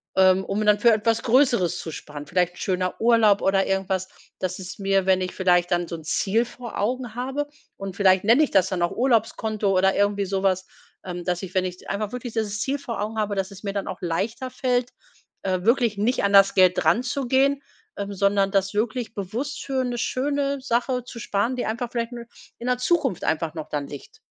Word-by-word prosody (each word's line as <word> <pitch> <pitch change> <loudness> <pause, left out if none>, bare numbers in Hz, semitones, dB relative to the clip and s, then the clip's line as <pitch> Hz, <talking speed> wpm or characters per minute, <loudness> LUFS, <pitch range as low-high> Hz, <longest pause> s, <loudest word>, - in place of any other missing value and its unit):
ähm, 190 0 +5
um 210 +2 -1
dann 210 -1 +4
für 235 +2 +5
etwas 225 +1 +1
Größeres 235 - +3
zu 165 - -6
sparen. 150 -1 -8
Vielleicht 180 +1 0
schöner 185 -1 -2
Urlaub 225 -3 +4
oder 195 0 +2
irgendwas, 190 -1 -1 0.3
dass 185 -1 -2
es 190 +1 -8
mir, 195 -1 +1
wenn 190 -1 +3
ich 185 0 -2
vielleicht 180 -2 +2
dann 175 0 +1
so - - -8
'n 160 - -10
Ziel 200 +8 +1
vor 240 -1 -8
Augen 245 +2 -2
habe, 265 +4 -2 0.3
und 195 -2 -7
vielleicht 190 -2 +4
nenne 230 +7 +5
ich 295 - 0
das 190 -1 +3
dann 185 -3 -2
auch 175 - +2
Urlaubskonto 220 -4 +1
oder 190 +1 +3
irgendwie 205 0 +1
sowas, 190 -1 0 0.4
ähm, 180 -1 -5
dass 180 +1 -2
ich, 185 -1 -7
wenn 185 -1 +1
ich 180 0 -7
einfach 205 +1 -3
wirklich 245 -2 -6
dieses 210 -2 -2
Ziel 275 +4 -1
vor 235 -6 -5
Augen 215 +2 -3
habe, 210 -1 -1
dass 195 0 -2
es 200 0 -11
mir 200 -2 -4
dann 200 -1 -3
auch - - -6
leichter 210 +9 -2
fällt, 250 -1 0 0.5
äh, 185 -2 0
wirklich 235 -3 +2
nicht 235 +5 +1
an 200 0 +1
das 195 0 +6
Geld 185 -1 +4
dranzugehen, 265 +3 +2 0.3
ähm, 200 0 -4
sondern 200 0 +2
das 195 0 +1
wirklich 225 +2 -2
bewusst 235 +9 -4
für 265 -1 -1
'ne 245 -1 -3
schöne 280 +2 -1
Sache 250 0 0
zu 245 -1 -10
sparen, 230 +2 -1
die 250 - -2
einfach 235 +2 -3
vielleicht 235 0 -2
nur 235 -1 -7 0.3
in 235 - -8
der 250 0 +1
Zukunft 270 - +1
einfach 160 0 -1
noch 155 -2 -7
dann 145 -1 -2
liegt. 145 - -11
205 Hz, 210 wpm, -24 LUFS, 190-240 Hz, 0.5 s, das